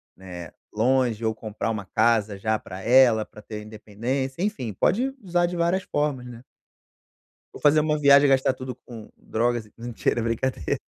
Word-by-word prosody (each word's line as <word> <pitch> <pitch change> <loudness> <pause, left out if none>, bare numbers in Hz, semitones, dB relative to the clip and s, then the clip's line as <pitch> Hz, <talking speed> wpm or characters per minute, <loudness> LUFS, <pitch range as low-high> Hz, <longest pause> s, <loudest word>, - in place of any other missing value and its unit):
né, 90 -3 -9 0.2
longe 120 0 +1
ou 110 -1 0
comprar 110 0 -4
uma 105 -3 -3
casa 110 -1 +1
já 110 +2 0
pra 95 -1 -9
ela, 120 -1 +5
pra 105 - -14
ter 105 0 -7
independência, 120 - -4
enfim, 160 - -2
pode 255 - +1
usar 175 -2 +1
de 175 0 -3
várias 175 +3 +1
formas, 145 -7 -2
né. 120 -1 -10 1.1
Ou - - -11
fazer 150 +1 +5
uma 150 0 +1
viagem 140 0 +6
e - - +2
gastar 135 -1 +3
tudo 130 -1 -7
com 115 -3 -10
drogas 120 0 -1
e, - - -23
n 115 - -8
mentira 120 0 -1
é - - -2
brincadeira. 115 - -1
120 Hz, 180 wpm, -24 LUFS, 110-140 Hz, 1.1 s, viagem